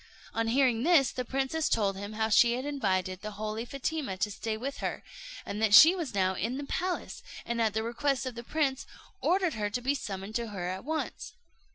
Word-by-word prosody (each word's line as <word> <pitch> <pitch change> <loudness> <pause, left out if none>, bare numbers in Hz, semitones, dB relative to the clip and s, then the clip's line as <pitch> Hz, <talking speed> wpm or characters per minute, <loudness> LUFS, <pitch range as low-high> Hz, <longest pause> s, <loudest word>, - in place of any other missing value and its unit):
On 230 0 0
hearing 245 -1 +3
this, 300 -3 +4
the 250 - -3
princess 270 +5 -1
told 200 -3 +1
him 205 +2 -6
how 220 +1 0
she 235 +2 +5
had 255 +3 -3
invited 190 -10 -1
the 215 - -5
holy 215 +2 -4
Fatima 275 -5 -3
to 210 +2 -1
stay 215 +2 -3
with 275 +5 -5
her, - - -4 0.4
and 210 - -4
that 215 -2 +5
she 325 +3 +10
was 330 - -4
now 190 -1 +2
in 230 +7 -2
the 285 - -4
palace; 360 +4 -3 0.2
and 235 0 -1
at 220 -2 +1
the 220 - 0
request 270 +3 -1
of 255 - -4
the 235 - -7
prince, 275 -1 -1 0.3
ordered 365 -2 +2
her 210 -1 -2
to 210 - -2
be 265 +3 0
summoned 195 -5 -5
to 235 0 -2
her 195 -4 -5
at 185 +1 -5
once. 315 +1 -4
235 Hz, 215 wpm, -29 LUFS, 210-275 Hz, 0.4 s, she